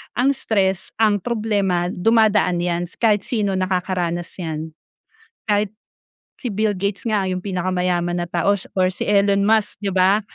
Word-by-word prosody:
ang 260 +4 +3
stress, 195 -8 0
ang 210 -2 +3
problema, 200 -6 0
dumadaan 210 -3 +2
'yan 175 0 -1
kahit 210 -4 +1
sino 205 -5 0
nakakaranas 180 -2 -1
'yan, 160 -1 -4 0.8
kahit 205 -1 +1 0.7
si 245 - -5
Bill 210 0 0
Gates 200 +4 -2
nga 205 -3 +1
'yong 185 -1 -2
pinakamayaman 180 -2 -1
na 175 - -3
tao 175 +3 +1 0.2
or 185 0 +2
si - - -4
Elon 200 -1 +3
Musk, 215 -2 +1
'di 195 -2 -2
ba? 190 +3 +4
195 Hz, 145 wpm, -21 LUFS, 180-210 Hz, 0.8 s, ba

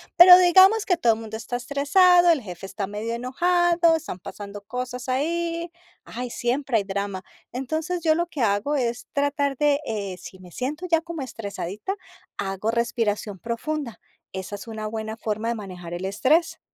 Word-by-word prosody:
pero 360 +1 +11
digamos 375 +4 +6
que 360 - +3
todo 235 -10 +2
mundo 220 -1 -7
está 235 +2 -4
estresado, 345 +8 +4
el 310 - +1
jefe 185 -3 -8
está 195 0 -4
medio 210 +3 -4
enojado, 340 +6 +2
están 300 - -7
pasando 205 +2 -9
cosas 250 +3 -5
ahí. 335 +5 -1 0.4
Ay, 245 +1 -6
siempre 250 +1 0
hay 205 - 0
drama. 200 -1 -3 0.3
Entonces, 315 +7 -3
yo 315 -1 +3
lo 345 +1 0
que 310 - -9
hago 215 +6 +1
es 240 -2 -2
tratar 285 -1 0
de, 295 +1 +2
eh, 200 -5 -4
si 190 - -11
me 180 -1 -14
siento 295 - -4
ya 330 -1 +3
como 335 -2 -6
estresadita, 210 - -5 0.4
hago 195 +2 -2
respiración 225 -4 -1
profunda. 240 - -4 0.3
Esa 190 +1 -6
es 200 - -10
una 220 -1 -5
buena 220 0 -4
forma 220 0 -3
de 235 - -1
manejar 180 -5 -8
el 175 +2 -4
estrés. 295 - +1
245 Hz, 170 wpm, -24 LUFS, 210-315 Hz, 0.4 s, pero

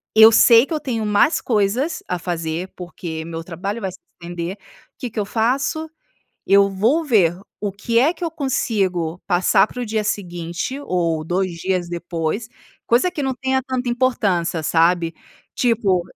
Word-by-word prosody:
eu 220 +1 +9
sei 230 +2 +7
que 325 - -5
eu 310 - 0
tenho 230 -5 -2
mais 210 +9 +3
coisas 240 +8 0
a 180 - -2
fazer, 170 +1 -3
porque 170 -2 -6
meu 165 0 -6
trabalho 185 +6 -4
vai 190 - -3
se 185 - -14 0.2
estender. 175 +2 -5
O 195 - -25
que 250 - -4
que 225 - -5
eu 205 - 0
faço? 270 +9 0 0.6
Eu 200 0 +6
vou 230 - +1
ver 185 - +3 0.2
o 205 - -1
que 230 +4 0
é 290 +8 +3
que 350 - -6
eu 335 - -1
consigo 195 - -1
passar 180 +3 +4
pro 245 +2 -5
dia 215 0 -1
seguinte 175 +5 -3
ou 170 - 0
2 180 +2 -1
dias 180 0 -1
depois, 170 +4 -3 0.4
coisa 245 +10 +3
que 335 -5 -4
não 265 -1 -1
tenha 265 0 0
tanta 255 -1 -3
importância, 200 -10 0
sabe? 165 +1 +2 0.4
Tipo, 215 -7 +2
200 Hz, 165 wpm, -21 LUFS, 175-245 Hz, 0.6 s, eu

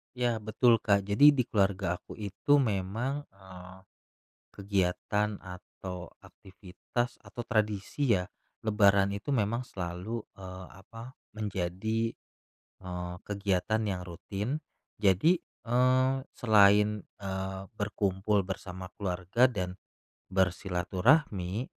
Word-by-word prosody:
Ya, 120 -2 +1
betul, 115 +2 +3
Kak. 100 -2 +1
Jadi 145 +9 +7
di 130 - +2
keluarga 95 -3 +1
aku - - -12
itu 110 +8 +2
memang, 115 +6 -1
eee, 95 -1 -12 0.7
kegiatan 100 +1 -1
atau 90 0 -9
aktivitas 95 +6 -5
atau 120 - -7
tradisi 110 +4 0
ya, 90 - -4 0.4
Lebaran 100 -2 +4
itu 100 +8 -4
memang 115 0 +1
selalu, 95 +1 -5 0.2
eee, 95 -1 -9 0.2
apa, 115 +5 -11 0.2
menjadi, 110 +2 -2 0.7
eee, 90 0 -5
kegiatan 100 +1 0
yang 95 -4 -2
rutin. 105 - -4 0.4
Jadi, 105 - +4 0.2
eee, 130 +2 +3 0.2
selain, 105 -1 +5 0.2
eee, 95 -1 -4
berkumpul 100 -1 0
bersama 95 -1 -7
keluarga 95 +6 +1
dan 90 -6 -3 0.6
bersilaturahmi, 95 - +1
100 Hz, 100 wpm, -30 LUFS, 95-115 Hz, 0.7 s, Jadi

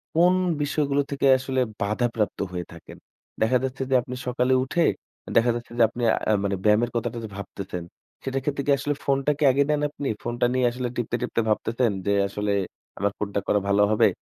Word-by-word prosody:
কোন 175 +2 +5 0.3
বিষয়গুলো 145 -1 +1
থেকে 140 0 -1
আসলে 130 0 -2 0.2
বাধাপ্রাপ্ত 110 +1 0
হয়ে 90 -1 -4
থাকেন? 85 - -12 0.4
দেখা 115 +3 +4
যাচ্ছে 130 0 -3
যে, - - +5
আপনি 125 +1 -7
সকালে 125 +1 +1
উঠে 165 +6 +1 0.4
আ - - -7
দেখা 120 +1 +5
যাচ্ছে 120 0 -7
যে - - +7
আপনি 120 - -5 0.3
আ - - +4
মানে 100 0 0
ব্যায়ামের 110 +3 +3
কথাটা 120 0 -2
যে 110 - -6
ভাবতেছেন, 95 -3 -6 0.4
সেটার 135 0 -2
ক্ষেত্রে 140 0 -1
কি - - +4
আসলে 145 +1 -1
ফোনটা 140 +1 +2
কি 150 - -1
আগে 140 +2 +3
নেন 150 -1 +2
আপনি? 145 -1 -5 0.2
ফোনটা 120 +1 0
নিয়ে 130 -1 +2
আসলে 125 +1 -3
টিপতে, 120 -1 -2
টিপতে 125 -1 0
ভাবতেছেন 115 +2 +1
যে 100 - +2
আসলে 105 +1 -2 0.5
"আমার 100 +1 +1
কোনটা 100 -1 -1
করা 105 - +3
ভালো 100 +1 +3
হবে?" 110 - +5
120 Hz, 195 wpm, -25 LUFS, 105-135 Hz, 0.5 s, যে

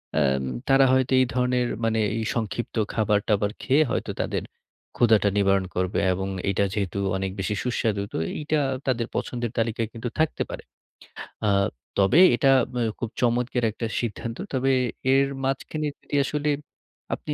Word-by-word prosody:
অ্যাম 70 -3 +2 0.2
তারা 135 0 +6
হয়তো 130 0 +2
এই 130 - +5
ধরনের, 125 0 +1 0.2
মানে 115 0 +1 0.2
এই 115 - -1
সংক্ষিপ্ত 115 0 -3 0.2
খাবার-টাবার 105 -1 +1
খেয়ে 145 +4 +4
হয়তো - - -2
তাদের - - -2 0.5
ক্ষুধাটা 110 -3 +4
নিবারণ 100 -1 +3
করবে 90 +1 0
এবং 95 +1 -3 0.2
এটা 100 +1 +1
যেহেতু 100 -3 -2 0.2
অনেক 95 0 -2
বেশি 95 +2 -1
সুস্বাদু, 115 -4 0
তো - - -2 0.2
এইটা 150 0 0 0.3
তাদের 120 -3 0
পছন্দের 120 -2 -2
তালিকায় 115 -1 0
কিন্তু 115 +1 -4
থাকতে 160 -1 +1
পারে। - - -7 0.8
আ - - +4 0.5
তবে 100 - +5 0.2
এটা 135 +3 +4 0.2
ব - - -8 0.2
খুব 120 - -3
চমৎকার 125 0 +1
একটা 115 - -5
সিদ্ধান্ত। 115 0 -4 0.2
তবে 135 0 +2 0.4
এর 135 0 +4 0.2
মাঝখানে 135 +3 -2
যদি - - -6
আসলে 150 +1 -1 0.7
আপনি 150 - -5
115 Hz, 150 wpm, -25 LUFS, 105-130 Hz, 0.8 s, তারা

